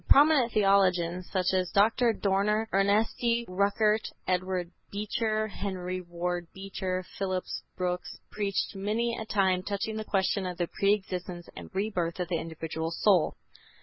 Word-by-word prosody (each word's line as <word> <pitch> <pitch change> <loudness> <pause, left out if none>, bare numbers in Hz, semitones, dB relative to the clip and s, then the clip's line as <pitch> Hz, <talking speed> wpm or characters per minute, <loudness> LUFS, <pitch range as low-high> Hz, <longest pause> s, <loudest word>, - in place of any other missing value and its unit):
Prominent 280 -4 +6
theologians, 185 -4 +3
such 185 -1 +1
as 185 -1 +1
Dr. 225 +4 +4
Dorner, 210 +1 +1
Ernesti, 220 +4 +2
Rückert, 205 +3 +1 0.2
Edward 185 -1 -1 0.2
Beecher, 215 +1 -1
Henry 185 -2 -4
Ward 175 0 -3
Beecher, 190 -1 -3
Phillips 185 -2 -2 0.2
Brooks, 180 -1 -2
preached 200 0 -1
many 220 +4 0
a 220 - -5
time 190 -3 +2
touching 205 +3 -3
the 215 - -3
question 195 -1 0
of 180 -1 -5
the 175 - +1
pre 200 +4 +2
existence 180 -3 -6
and - - -9
rebirth 190 -4 -1
of 180 -2 -2
the 170 -3 0
individual 160 0 -4
soul. 180 0 +3
195 Hz, 140 wpm, -29 LUFS, 180-210 Hz, 0.2 s, Prominent